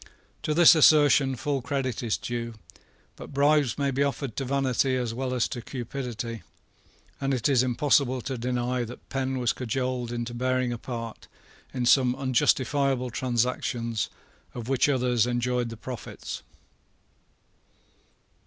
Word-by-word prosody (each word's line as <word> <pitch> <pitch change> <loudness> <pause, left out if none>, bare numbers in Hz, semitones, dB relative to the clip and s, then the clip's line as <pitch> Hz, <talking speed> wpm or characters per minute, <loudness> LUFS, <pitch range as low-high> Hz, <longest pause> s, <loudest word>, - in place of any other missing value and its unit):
To 150 - -1
this 170 0 +8
assertion 145 -4 +5
full 140 +2 -2
credit 130 -3 -2
is 115 -3 0
due. 115 -1 -4 0.6
But - - -11
bribes 145 -4 +3
may 140 -1 0
be 135 +1 -1
offered 140 -3 -1
to 135 - -1
vanity 130 0 +1
as 120 -3 -2
well 130 +2 -3
as 125 -2 +1
to 125 -3 -5
cupidity; 120 -3 -5 0.8
and 135 -1 +1
it 120 - 0
is 135 -4 +4
impossible 130 +1 +2
to 135 +2 -4
deny 125 +1 -1
that 120 +2 -10
Penn 135 0 -2
was 125 -2 +1
cajoled 125 0 -2
into 120 0 -4
bearing 130 0 0
a 120 - -6
part 115 -3 -7 0.4
in 125 -2 -2
some 125 0 +4
unjustifiable 130 0 +1
transactions 120 -2 -1 0.5
of 120 -2 -6
which 135 +1 +2
others 125 -4 +2
enjoyed 120 0 0
the 115 - -8
profits. 125 -1 -7
125 Hz, 140 wpm, -27 LUFS, 120-135 Hz, 0.8 s, this